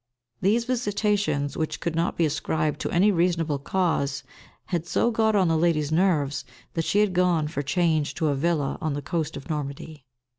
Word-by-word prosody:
These 225 +5 +2
visitations, 205 - 0
which 155 -1 -2
could 170 - -2
not 165 +1 0
be 170 - +3
ascribed 155 0 -1
to - - -2
any 190 +5 +4
reasonable 165 -5 +1
cause, 145 -4 -1 0.4
had 170 -2 -3
so 235 +6 +2
got 220 -1 +2
on 190 -3 +4
the 165 - +2
lady's 155 -2 +1
nerves 155 -5 +1 0.3
that 165 -1 -1
she - - +1
had 210 -3 +1
gone 175 -4 +2
for 145 -2 -3
change 155 +1 0
to 160 -3 0
a 145 - +1
villa 150 -1 0
on 155 -2 -1
the 145 - -4
coast 160 -4 -2
of 135 - -10
Normandy. 150 -1 -5
165 Hz, 185 wpm, -25 LUFS, 150-180 Hz, 0.4 s, any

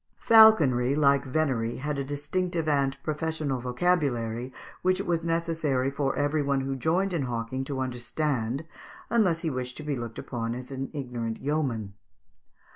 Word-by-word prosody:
] - - -43
Falconry, 150 - +6
like 140 -2 +4
venery, 130 -5 0
had 145 +1 -3
a - - -1
distinctive 155 +4 -2
and 140 -2 +1
professional 155 -3 -2
vocabulary, 125 -4 0 0.3
which 185 0 +2
it - - -3
was 170 -1 0
necessary 165 -6 0
for 140 -1 -1
every 145 +1 +1
one 140 -1 +1
who 135 0 -2
joined 180 +8 +1
in 165 - 0
hawking 125 +1 -3
to 135 -1 -4
understand, 130 +1 -2 0.5
unless 190 -8 +3
he 160 - -1
wished 125 -1 -4
to 155 - -7
be 150 -2 -2
looked 120 -2 -6
upon 115 -2 -3
as 125 +1 -8
an 135 0 -4
ignorant 120 -6 -4
yeoman. 130 -9 -1
140 Hz, 160 wpm, -27 LUFS, 125-160 Hz, 0.5 s, Falconry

